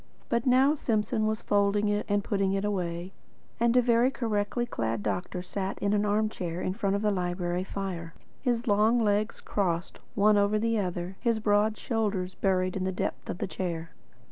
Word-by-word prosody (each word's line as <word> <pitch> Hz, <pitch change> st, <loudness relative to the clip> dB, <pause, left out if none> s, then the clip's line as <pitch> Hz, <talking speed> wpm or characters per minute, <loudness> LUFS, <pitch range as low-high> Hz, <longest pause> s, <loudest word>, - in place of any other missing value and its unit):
But 235 Hz, +2 st, 0 dB
now 260 Hz, +3 st, +5 dB
Simpson 220 Hz, -5 st, 0 dB
was 220 Hz, 0 st, -2 dB
folding 205 Hz, +1 st, +2 dB
it 205 Hz, 0 st, 0 dB
and 205 Hz, 0 st, +2 dB
putting 195 Hz, -1 st, 0 dB
it 195 Hz, +1 st, 0 dB
away, 180 Hz, -2 st, -2 dB, 0.5 s
and 235 Hz, +1 st, +3 dB
a 250 Hz, -, +5 dB
very 235 Hz, +1 st, +4 dB
correctly 225 Hz, -2 st, -1 dB
clad 115 Hz, -, -2 dB
doctor 180 Hz, 0 st, -2 dB
sat 190 Hz, +1 st, -3 dB
in 200 Hz, 0 st, 0 dB
an 210 Hz, 0 st, +2 dB
arm 210 Hz, +1 st, +2 dB
chair 175 Hz, -5 st, -4 dB
in 185 Hz, -, -1 dB
front 200 Hz, -1 st, 0 dB
of 200 Hz, -, -2 dB
the 210 Hz, -, +3 dB
library 180 Hz, -1 st, -1 dB
fire, 185 Hz, -4 st, -5 dB, 0.3 s
his 240 Hz, -2 st, 0 dB
long 215 Hz, +3 st, +4 dB
legs 210 Hz, 0 st, +1 dB
crossed 180 Hz, -3 st, -1 dB
the -, -, -26 dB, 0.2 s
one 210 Hz, 0 st, +5 dB
over 200 Hz, +1 st, +2 dB
the 225 Hz, 0 st, +1 dB
other, 180 Hz, 0 st, -3 dB
his 230 Hz, -2 st, +2 dB
broad 210 Hz, 0 st, +2 dB
shoulders 205 Hz, -6 st, -1 dB
buried 185 Hz, -1 st, 0 dB
in 190 Hz, -, -1 dB
the 190 Hz, -, 0 dB
depths 185 Hz, -, -4 dB
of -, -, -3 dB
the -, -, -2 dB
chair. 170 Hz, -3 st, -4 dB
205 Hz, 195 wpm, -28 LUFS, 185-220 Hz, 0.5 s, now